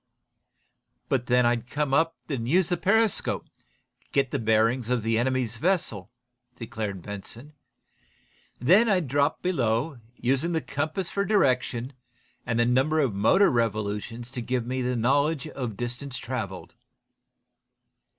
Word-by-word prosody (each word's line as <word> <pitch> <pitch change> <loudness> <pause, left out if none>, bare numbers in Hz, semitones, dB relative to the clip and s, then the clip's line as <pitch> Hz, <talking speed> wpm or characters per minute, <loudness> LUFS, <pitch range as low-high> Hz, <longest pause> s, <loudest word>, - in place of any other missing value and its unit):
"But 125 -2 0
then 125 0 +4
I'd 120 0 0
come 145 0 -1
up 165 +3 +3
enough 135 -5 -2
to 120 - -4
use 180 +3 +3
the 175 - +1
periscope, 220 +3 +2
and - - -38
get 135 -2 +1
the 140 - -1
bearings 115 +2 +2
of 125 -3 0
the 115 0 +1
enemy's 125 -2 -1
vessel," 135 - -1 0.5
declared 110 -6 -5
Benson. 115 +8 -8 1.1
"Then 190 - +5
I'd 180 -7 +2
drop 145 +3 +1
below, 130 -4 0 0.2
using 135 +8 0
the 160 - +2
compass 155 +6 -3
for 200 - 0
direction, 130 - +1 0.5
and 115 -1 0
the 120 - +4
number 135 +6 +2
of 135 -8 +1
motor 110 - +4
revolutions 115 0 -2
to 125 - -4
give 125 0 -2
me 130 +1 -2
the 125 0 -1
knowledge 140 +6 +1
of 120 -8 -5
distance 125 +2 -5
traveled." 110 -7 -5
125 Hz, 140 wpm, -26 LUFS, 115-150 Hz, 1.1 s, Then